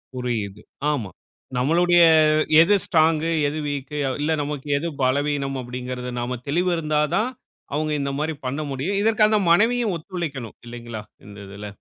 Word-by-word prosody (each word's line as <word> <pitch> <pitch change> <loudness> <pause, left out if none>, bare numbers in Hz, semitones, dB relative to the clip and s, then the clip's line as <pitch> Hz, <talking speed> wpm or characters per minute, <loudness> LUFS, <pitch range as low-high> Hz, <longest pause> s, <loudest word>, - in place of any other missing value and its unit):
புரியுது. 110 -5 -3 0.3
ஆமா. 115 -10 -3 0.5
நம்மளுடைய 175 +6 +4 0.6
எது 205 +5 +5
ஸ்ட்ராங்கு 160 0 +2 0.2
எது 155 +2 -3
வீக்கு 145 +1 -4 0.2
இல்ல 155 +2 0
நமக்கு 145 -1 -5
எது 170 +4 -2
பலவீனம் 140 +1 0
அப்படிங்கிறது, 125 0 -5
நாம 120 0 -3
தெளிவு 175 +5 +1
இருந்தா 155 -1 0
தான். 220 +5 +1 0.4
அவங்க 155 +1 -1
இந்த 140 0 -2
மாரி 155 +1 -1
பண்ண 140 +4 -2
முடியும். 160 +10 -2
இதற்கு 220 0 +3
அந்த 215 -1 +2
மனைவியும் 225 +2 +3
ஒத்துழைக்கணும் 155 - -6
இல்லைங்களா? 120 -2 -7 0.2
இந்த 100 -1 -12
இதுல. 100 +1 -8
145 Hz, 140 wpm, -23 LUFS, 125-170 Hz, 0.6 s, எது